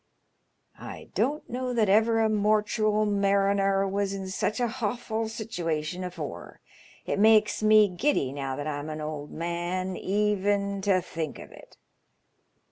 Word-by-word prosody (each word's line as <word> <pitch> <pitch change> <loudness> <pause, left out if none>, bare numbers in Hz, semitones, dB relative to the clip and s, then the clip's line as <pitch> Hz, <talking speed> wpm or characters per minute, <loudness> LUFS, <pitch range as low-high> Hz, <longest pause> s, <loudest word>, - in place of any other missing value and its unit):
I - - -9
don't 295 +3 -1
know 250 0 -3
that 220 -3 +3
ever 225 +3 +4
a - - +4
mortual 215 0 +2
mariner 195 -1 +2
was 195 0 -1
in 190 -1 -5
such 205 +4 -1
a 245 - +2
hawfal 225 -1 -3
situation 175 -7 -3
afore. 155 - -7 0.5
It - - -1
makes 215 0 +4
me 215 -1 +6
giddy, 180 - 0
now 135 -2 -3
that 145 +1 -5
I'm 150 0 -4
an 155 0 -5
old 150 -1 -5
man, 175 +3 -3
even 200 0 0
to 190 -2 +2
think 160 -3 -5
of - - -11
it. - - -16
200 Hz, 140 wpm, -27 LUFS, 175-215 Hz, 0.5 s, me